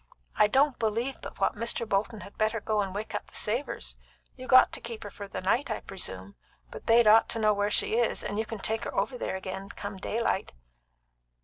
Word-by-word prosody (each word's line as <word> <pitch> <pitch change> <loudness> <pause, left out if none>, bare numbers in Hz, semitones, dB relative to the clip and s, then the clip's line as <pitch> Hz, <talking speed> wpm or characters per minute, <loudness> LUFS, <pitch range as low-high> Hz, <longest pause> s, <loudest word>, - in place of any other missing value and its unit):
"I 210 - +5
don't 270 +4 +3
believe 230 +4 -1
but - - -9
what 195 - +2
Mr. 230 +1 -2
Bolton 210 +2 -1
had 200 - -11
better 220 +1 0
go 215 0 0
and 195 -2 -3
wake 215 +2 -4
up - - -4
the - - -14
Savors. 210 - -1 0.4
You 255 - -9
got 255 - +7
to - - -5
keep 230 -1 -7
her 205 - -8
for 200 +1 -8
the - - -5
night, 245 +9 +1
I 220 - -2
presume, 95 - -5 0.4
but - - -10
they'd 230 +1 +6
ought 215 +1 +6
to 230 - -3
know 215 -1 +4
where 205 0 0
she 220 +2 +2
is, 235 - +1
and 205 +1 -3
you 220 - 0
can 225 - -5
take 220 +3 -1
her - - -5
over 260 - 0
there 240 - -3
agin, 190 +1 -6
come 200 -1 -7
daylight." 210 0 -1
215 Hz, 225 wpm, -28 LUFS, 200-230 Hz, 0.4 s, got